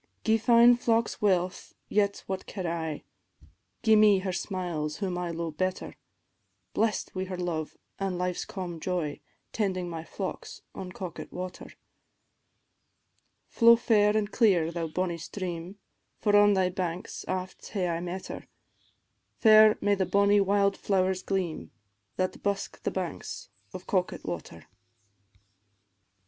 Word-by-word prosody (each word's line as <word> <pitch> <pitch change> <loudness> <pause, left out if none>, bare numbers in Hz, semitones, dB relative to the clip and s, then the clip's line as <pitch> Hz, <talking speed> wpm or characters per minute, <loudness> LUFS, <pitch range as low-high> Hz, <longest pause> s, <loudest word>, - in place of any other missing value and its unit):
"Gie 225 0 +3
fine 235 +1 +6
focks 230 -2 0
wealth, 185 -3 0
yet 200 -1 +1
what 190 -1 -5
care 185 -3 -4
I, 160 -2 -3 0.8
Gie 220 -1 +6
me 210 -2 +6
her 185 0 -2
smiles 175 -6 -3
whom 190 -3 -2
I 175 -1 -3
lo'e 170 -1 -3
better; 185 +3 -2 0.8
Blest 220 -2 0
wi' 185 0 -2
her 185 -1 -5
love 170 -3 -3 0.2
an' 195 -2 -2
life's 180 0 -2
calm 175 -3 -6
joy, 170 -5 -2 0.3
Tending 185 -4 -1
my 165 -2 -5
flocks 190 +3 -6
by 185 - -7
Coquet 180 -1 -7
water. 180 0 -6 1.8
"Flow 235 0 +6
fair 215 -3 +3
an' 205 -1 0
clear, 185 -9 +3
thou 170 -1 -3
bonnie 170 +1 -2
stream, 180 +1 -6 0.4
For 205 -2 +2
on 205 0 +6
thy 185 -1 +2
banks 180 -1 -4
aft 185 0 -4
hae 190 -4 -1
I 165 0 -1
met 180 +2 -5
her; - - -8 0.9
Fair 215 -1 +7
may 205 - +3
the 190 -2 0
bonnie 200 0 +4
wild 200 0 +2
flowers 190 -1 +1
gleam, 185 -5 -2 0.5
That 185 0 -2
busk 200 -1 -2
the - - -1
banks - - -5 0.2
of - - -8
Coquet 185 -4 -1
water." 85 -2 -6
185 Hz, 135 wpm, -28 LUFS, 175-205 Hz, 1.8 s, Fair